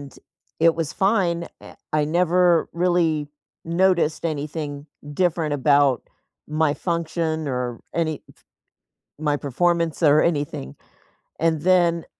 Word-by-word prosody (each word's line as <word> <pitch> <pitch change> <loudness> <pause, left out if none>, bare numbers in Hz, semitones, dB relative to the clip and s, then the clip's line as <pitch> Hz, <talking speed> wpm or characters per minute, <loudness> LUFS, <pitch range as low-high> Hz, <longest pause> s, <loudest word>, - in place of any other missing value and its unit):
And 140 -1 -11 0.5
it 165 0 +5
was 165 -3 -3
fine, 185 -4 +1 0.2
eh, - - -12 0.2
I 150 - +3
never 175 +1 +2
really 170 -4 +1 0.4
noticed 170 -2 +1
anything 150 -1 -4 0.3
different 165 -3 0
about 140 -2 +3 0.4
my 155 -1 +1
function 160 -2 -2
or 125 -2 -3
any 160 -3 -1
p - - -22 0.9
my 150 -2 0
performance 165 +4 0
or 150 -1 +5
anything. 145 - -2 0.7
And 160 -2 +1
then 175 -2 +3
160 Hz, 115 wpm, -22 LUFS, 145-170 Hz, 0.9 s, it